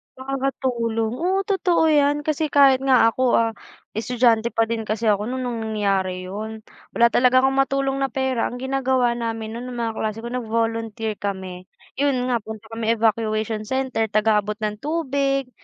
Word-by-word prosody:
Nakakatulong. 255 -4 -2
Oo, 375 +3 +1
totoo 370 -4 +2
'yan 290 0 +3
kasi 310 0 0
kahit 275 -2 +5
nga 255 -4 +4
ako, 255 +1 +2
ah, 230 0 +2 0.5
estudyante 235 -1 +2
pa 225 - +3
din 230 -1 -1
kasi 220 +2 -2
ako 210 +1 +1
no'n 260 0 -3
nang 245 -2 -3 0.2
nangyari 190 -3 0
'yon. 215 +3 -6 0.3
Wala 235 - +6
talaga 255 +1 +4
akong 270 0 +2
matulong 270 0 +1
na 270 - +1
pera 265 -3 -1
ang 245 - -6
ginagawa 260 -2 +1
namin 225 -1 -4
no'n 250 +1 -6
mga 235 -2 -2
klase 215 0 -2
ko 235 - -5
nag-volunteer 225 -2 -2
kami. 190 -2 -5 0.3
Iyon 280 -1 +2
nga 245 - +2
punta 220 0 -9
kami 225 0 0
Evacuation 220 -1 0
Center, 260 -4 -1
taga-abot 210 0 +1
ng 210 -1 -2
tubig, 275 -3 -1
235 Hz, 160 wpm, -22 LUFS, 220-270 Hz, 0.5 s, Wala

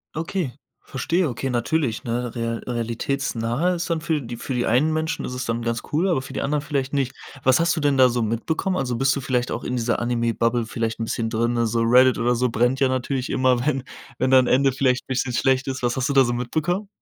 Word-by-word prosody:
Okay, 165 -4 -2 0.3
verstehe. 165 +5 -1
Okay, 130 +2 -3
natürlich, 120 0 -1
ne, 120 0 -3
rea 115 -1 -2
realitätsnahe 120 +5 -1
ist 175 0 -3
dann 165 -1 0
für 160 -3 -1
die 120 0 -7
für 130 - -4
die 120 - 0
einen 130 +8 +3
Menschen 160 +1 -2
ist 125 - -5
es 125 - -3
dann 115 +1 -2
ganz 115 0 -2
cool, 180 +5 +2
aber 135 -7 +1
für - - -9
die - - -2
anderen 145 +1 -1
vielleicht 140 -2 -2
nicht. 135 -2 0 0.3
Was 130 +2 +4
hast 170 +1 +2
du - - -2
denn 145 -2 +2
da 130 -1 +6
so 120 -1 0
mitbekommen? 155 - -1
Also, 125 -5 -1
bist 135 +3 +2
du 140 - -3
vielleicht 125 -1 -1
auch 115 - -3
in 125 - -2
dieser 120 -1 0
Anime 120 -1 0
Bubble 115 +1 +1
vielleicht 115 0 -3
'n - - -1
bisschen 115 0 -2
drin, 120 +1 0
also 115 0 +1
Reddit 125 +2 +5
oder 120 +1 +2
so 125 +1 +1
brennt 120 +4 +1
ja 135 - +4
natürlich 130 0 -2
immer, 130 -2 +2
wenn 135 -4 0 0.3
wenn 130 +1 +1
da 130 - +8
'n 125 - +2
Ende 135 +2 +3
vielleicht 130 -1 +1
'n - - -50
bisschen 130 -1 -1
schlecht 130 +1 +1
ist. 130 -2 -4
Was 120 0 +1
hast 130 +1 -1
du - - +1
da 135 -1 +6
so 120 - -1
mitbekommen? 160 - -2
125 Hz, 245 wpm, -23 LUFS, 120-140 Hz, 0.3 s, da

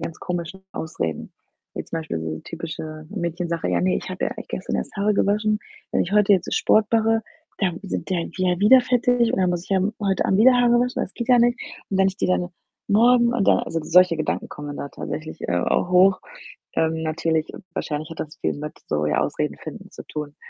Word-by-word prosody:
ganz 165 -1 -6
komischen 175 +1 -4
Ausreden. 80 - -4 0.4
Jetzt - - -6
zum 165 - -2
Beispiel 150 - -4
so 80 -1 -4
typische 155 -1 -7
Mädchensache: 170 -3 -3
„Ja, 90 -1 +1
ne, 90 0 +2
ich - - -6
habe - - -2
ja - - -3
eigentlich - - -10
gestern - - -3
erst 65 - -5
Haare 205 +1 +2
gewaschen. 210 +2 +1 0.3
Wenn - - +2
ich 175 - -5
heute 210 -1 +5
jetzt 185 -2 +1
Sport 215 -1 +3
mache, 225 0 +3 0.4
dann 180 -4 0
sind 195 - -4
die 185 - +1
halt 170 -1 -4
wie 185 - +1
ja, 180 - 0
wieder 255 +6 +7
fettig 245 -1 +2
und - - 0
dann 185 -1 +2
muss 175 -1 -2
ich - - -18
ja 195 - +3
m 195 +3 0
heute 195 -2 +1
Abend 190 - +2
wieder 250 +4 +7
Haare 240 -1 +4
waschen, 250 +1 -1
das 190 - -6
geht 235 +2 -5
ja 245 - +6
nicht 240 +1 +3 0.3
und 190 - 0
wenn 190 0 +5
ich 190 - -6
die - - 0
dann 180 -1 +1 0.4
morgen 235 +3 +4
und 210 -5 +1
dann“ - - +5
also 165 - -3
solche 180 +1 +5
Gedanken 155 -1 -2
kommen 145 -1 -7
da 140 - -5
tatsächlich, 155 +2 -6
äh, - - +1
auch 175 - 0
hoch. 185 +1 +5 0.5
Ähm, 160 0 0
natürlich 160 0 -1 0.2
wahrscheinlich 150 -3 -3
hat 165 - -7
das 155 0 -6
viel - - -1
mit 150 +1 -7
so, 75 0 0
ja, 75 - +1
Ausreden - - -2
finden - - -10
zu - - -10
tun. 150 -1 -6
180 Hz, 230 wpm, -23 LUFS, 155-210 Hz, 0.5 s, wieder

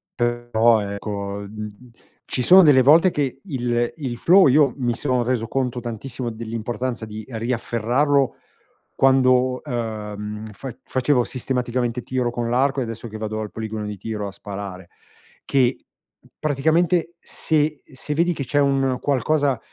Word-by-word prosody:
però 120 -2 +2
ecco, 100 0 -4
mhmm, 105 +1 -6 0.6
ci 125 - -1
sono 185 +6 +8
delle 140 -4 +6
volte 160 +7 +6
che 140 -5 -2
il 120 -5 -1
il 130 -6 -4
flow, 185 +8 +6
io 140 0 +4
mi 120 -2 0
sono 125 -3 0
reso 120 -2 -1
conto 125 -1 -1
tantissimo 120 +1 -5
dell'importanza 115 +2 -4
di 110 0 -8
riafferrarlo 120 +3 0 0.6
quando, 130 -1 +3
ehm, 105 -4 -5
fa 130 +3 -7
facevo 130 -1 +1
sistematicamente 125 -1 -2
tiro 125 -1 -1
con 120 -1 -3
l'arco 135 +3 +1
e 130 - 0
adesso 115 0 -6
che 110 -1 -8
vado 110 0 -3
al 105 -1 -5
poligono 110 -1 -5
di 105 0 -5
tiro 105 +1 -4
a - - -6
sparare, 95 -3 -8 0.6
che 130 -2 +1 0.5
praticamente 160 +4 +1
se 155 -3 -1
se 135 +3 -6
vedi 170 +2 +2
che 140 - -4
c'è 145 - -2
un 135 -2 +2
qualcosa 140 -1 +1
125 Hz, 145 wpm, -22 LUFS, 110-135 Hz, 0.6 s, sono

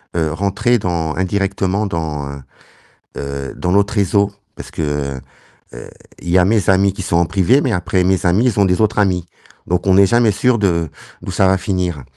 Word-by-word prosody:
heu, 80 -3 0
rentrer 100 +8 0
dans 85 -4 -2
indirectement 95 +1 -1
dans, 80 -6 -4
heu 70 -1 -9 0.8
heu, 70 -1 -5
dans 90 - -2
l'autre 100 +2 +2
réseau, 100 0 +1 0.2
parce - - -10
que, 75 -3 -3 0.5
heu, - - -10 0.3
il - - -6
y 90 - +3
a 90 - +4
mes 105 -1 +1
amis 95 0 +3
qui 100 - -7
sont 85 -2 0
en 85 - +3
privé, 100 - +2
mais 130 - -1
après 90 -1 0
mes 95 +1 +1
amis 95 +7 +3
ils 115 -5 +1
ont 100 - +4
des 90 +2 +1
autres 105 -1 +1
amis, 90 -4 +1 0.4
donc 90 0 -1
on 95 - +4
n'est 100 +1 +6
jamais 120 +1 +3
sûr 125 +4 +1
de 85 -6 0 0.3
d'où - - -6
ça 95 - +2
va 95 0 +3
finir. 90 -6 -3
95 Hz, 200 wpm, -17 LUFS, 85-100 Hz, 0.8 s, n'est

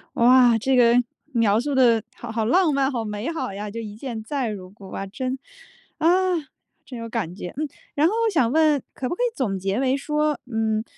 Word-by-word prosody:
哇， 245 -1 +6
这 260 +4 +1
个， 240 -1 +5 0.4
描 225 -3 +3
述 285 +2 -2
得 235 -4 +4
好 235 -1 -7
好 220 -1 -1
浪 335 +4 +3
漫， 275 0 +1
好 235 -3 -2
美 210 +6 -4
好 320 -11 -4
呀！ 205 +1 -5
这 230 +3 -5
一 210 -1 -7
见 230 -2 -6
再 265 -2 -2
如 185 -3 -7
故， 200 -2 -13
哇！ 195 - -5
真， 255 +7 -4 0.6
啊， 320 - +2 0.8
真 250 - -8
有 230 - -5
感 190 -7 -3
觉， 180 -3 -7
嗯。 305 0 -1 0.3
然 300 +3 +3
后 410 - 0
我 450 - +3
想 250 -8 +3
问 305 -3 +3
可 255 - -4
不 345 - -2
可 - - -5
以 - - +3
总 200 -7 -1
结 195 +5 -1
为 265 0 +2
说， 300 0 0
嗯， 220 -1 0
240 Hz, 230 characters per minute, -23 LUFS, 215-275 Hz, 0.8 s, 哇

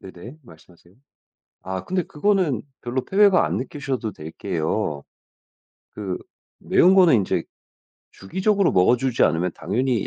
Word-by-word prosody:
네네 95 - -11
말씀하세요. 85 -2 -19 0.7
아 95 0 -5
근데 180 -1 -1
그거는 170 - 0 0.2
별로 125 +1 -3
패배감 200 -1 +4
안 - - -1
느끼셔도 130 -4 -4
될게요. 80 -2 -3 0.9
그 95 -3 -5 0.4
매운 185 +2 +4
거는 180 -6 +6
인제 100 -4 -1 0.7
주기적으로 190 - 0
먹어주지 120 +6 +2
않으면 85 +2 +2
당연히 120 0 -1
120 Hz, 285 characters per minute, -22 LUFS, -, 0.9 s, 거는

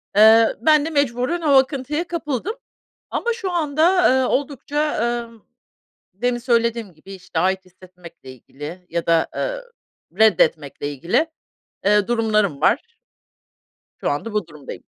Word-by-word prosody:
Eee, 220 +2 +6
ben 305 +2 +4
de - - -2
mecburen 285 +2 0
o 310 - 0
akıntıya 270 +4 +2
kapıldım. 335 - -3 0.5
Ama 470 - -1
şu 395 -5 -4
anda, 335 +2 +3
eee, 260 - +1
oldukça, 290 +3 -1 0.3
ımm, 225 -2 -19 0.7
demin 240 +4 -1
söylediğim 235 -4 0
gibi, 190 +6 -13
işte, 185 - -5
ait 190 0 0
hissetmekle 180 -6 -14
ilgili 150 +8 -10
ya 170 0 -2
da, 165 -1 +3
eee, - - -3 0.6
reddetmekle 155 -9 +2
ilgili, 170 - 0 0.6
eee, 205 0 +3
durumlarım 215 -9 +1
var 460 - +1 1.0
şu - - -1
anda 180 +10 -3
bu 210 -5 -1
durumdayım. 150 -4 -10
230 Hz, 130 wpm, -21 LUFS, 185-295 Hz, 1.0 s, Eee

